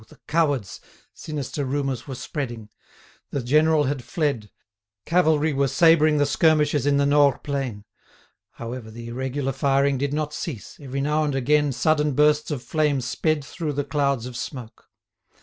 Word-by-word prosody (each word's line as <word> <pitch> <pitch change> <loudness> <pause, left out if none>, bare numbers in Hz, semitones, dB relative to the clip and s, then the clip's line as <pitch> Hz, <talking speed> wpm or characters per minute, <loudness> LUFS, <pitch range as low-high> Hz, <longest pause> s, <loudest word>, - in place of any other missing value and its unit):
the - - -18
cowards!" 145 - 0 0.3
sinister 145 -1 -5
rumours 135 -1 -2
were 135 - -5
spreading—the 120 0 -8
general 155 +4 +3
had 135 -2 -2
fled; 140 - -2 0.6
cavalry 160 -3 +2
were 140 0 +1
sabring 155 +2 +4
the 145 - +3
skirmishers 150 -1 +2
in 140 -1 +3
the 140 - +3
Nores 145 -2 +3
plain. 130 -8 -4 0.7
However, 115 -1 -7
the 115 +1 -9
irregular 130 +3 -2
firing 140 0 +1
did 140 0 -1
not 150 0 -2
cease, 145 - -6
every 135 -1 -4
now 150 +2 +1
and 145 -2 -1
again 145 +2 +2
sudden 150 +3 +1
bursts 150 +2 +3
of 140 -5 -4
flame 150 +1 +1
sped 145 +4 -1
through 155 +3 -4
the 145 +1 -1
clouds 140 -3 0
of 125 -1 -8
smoke. 125 -2 -8
140 Hz, 150 wpm, -24 LUFS, 130-150 Hz, 0.7 s, sabring